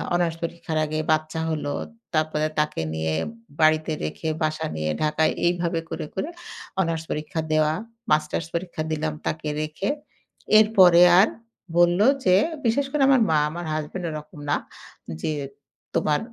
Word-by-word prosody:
Honours 170 -2 +1
পরীক্ষার 165 -1 -3
আগে 155 +1 -2
বাচ্চা 155 +1 0
হল। 155 -2 -2 0.5
তারপরে 155 0 +1
তাকে 150 - 0
নিয়ে 80 0 -1 0.5
বাড়িতে 155 0 +4
রেখে 75 - -3
বাসা 155 0 -1
নিয়ে 75 0 -1
ঢাকায় 155 +1 +2
এইভাবে 170 -1 +1
করে, - - -4
করে 280 - -2 0.5
অনার্স 165 -2 -1
পরীক্ষা 155 +1 -3
দেওয়া। 155 0 +3 0.4
মাস্টার্স 155 +1 +1
পরীক্ষা 170 -2 -3
দিলাম 155 0 -1
তাকে 155 -1 -2
রেখে। 155 +5 -3 0.7
এরপরে 190 -5 +6 0.2
আর 200 - +6 0.5
বলল 175 +1 +5 0.3
যে 185 -1 +6 0.3
বিশেষ 275 +5 +2
করে 295 - 0
আমার 265 -3 +5
মা, 155 - +4
আমার 175 +2 -6
হাসব্যান্ড 155 +4 -4
এরকম 150 -1 -8
না। - - +3 0.7
যে, - - -1 0.6
"তোমার 150 -1 +2
155 Hz, 140 wpm, -24 LUFS, 155-175 Hz, 0.7 s, এরপরে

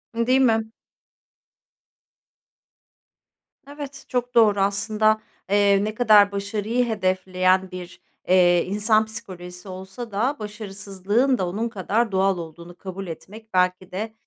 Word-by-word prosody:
Değil 250 +3 +2
mi? 225 -3 +2 3.0
Evet, 285 -1 -9
çok 245 0 -3
doğru 215 -3 +5
aslında, 215 +2 +1 0.3
eee, 200 0 +3
ne 215 +1 -3
kadar 210 -4 +5
başarıyı 210 +4 -1
hedefleyen 185 -3 +1
bir, 180 -1 -9 0.3
eee, 175 -1 +4
insan 215 +3 +2
psikolojisi 180 -4 -9
olsa 190 +5 -8
da 235 +8 0
başarısızlığın 210 +3 -1
da 185 - -1
onun 215 +6 -2
kadar 220 +2 -1
doğal 190 0 +2
olduğunu 170 +1 -9
kabul 190 0 -7
etmek 215 +6 -10
belki 180 0 +1
de, 215 +4 -4
205 Hz, 115 wpm, -23 LUFS, 185-220 Hz, 3.0 s, doğru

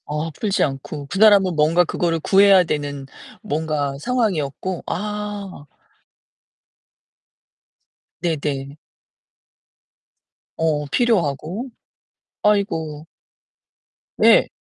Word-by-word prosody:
어 150 +2 -3
풀지 200 +5 -1
않고 140 +1 -4
그 195 - -3
사람은 200 -4 +5
뭔가 155 +4 +3
그거를 170 -1 -1
구해야 195 +2 +5
되는 145 -4 -4 0.4
뭔가 150 -2 -2
상황이었고? 185 - -2
아. 205 -4 -5 2.5
네네. 145 -4 -3 1.8
어 155 -2 0
필요하고. 200 - 0 0.7
아이고. 160 -8 0 1.1
네. - - +5
165 Hz, 155 characters per minute, -21 LUFS, 150-200 Hz, 2.5 s, 사람은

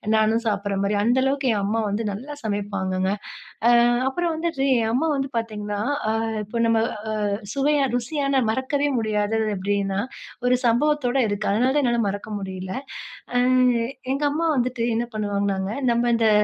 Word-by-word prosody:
நானும் 220 +2 +2
சாப்புடுற 200 -1 -1
மாரி. 205 +1 +1
அந்த 240 +3 +3
அளவுக்கு 275 0 0
என் 205 - 0
அம்மா 225 +3 0
வந்து 210 +3 -1
நல்லா 255 +9 -6
சமைப்பாங்கங்க. 195 -3 -1 0.6
அ - - +7 0.4
அப்புறம் 340 +4 -1
வந்துட்டு 320 -4 -1 0.2
என் 225 0 0
அம்மா 315 +6 +1
வந்து 270 0 -2
பார்த்தீங்கன்னா, 210 -2 -4 0.3
அ - - +2 0.3
இப்ப 230 +3 -3
நம்ம 230 -1 +3 0.4
அ - - +1 0.3
சுவையா 290 +2 +2 0.2
ருசியான 275 +1 0
மறக்கவே 270 +4 0
முடியாதது 215 0 0
அப்படின்னா, 195 0 -1 0.5
ஒரு 250 0 +4
சம்பவத்தோடு 265 +1 +2
இருக்கு. 205 +1 -2
அதனால 245 +5 +2
தான் 295 - +3
என்னால 235 -1 +2
மறக்க 200 +2 -5
முடியல. 185 -1 -5 0.6
அ - - +4 0.8
எங்க 280 +2 -2
அம்மா 330 +3 0
வந்துட்டு 250 0 -1 0.2
என்ன 235 - 0
பண்ணுவாங்கன்னாங்க 200 -2 -1 0.2
நம்ம 235 +1 +2
இந்த 225 -1 +3
225 Hz, 155 wpm, -23 LUFS, 205-265 Hz, 0.8 s, அ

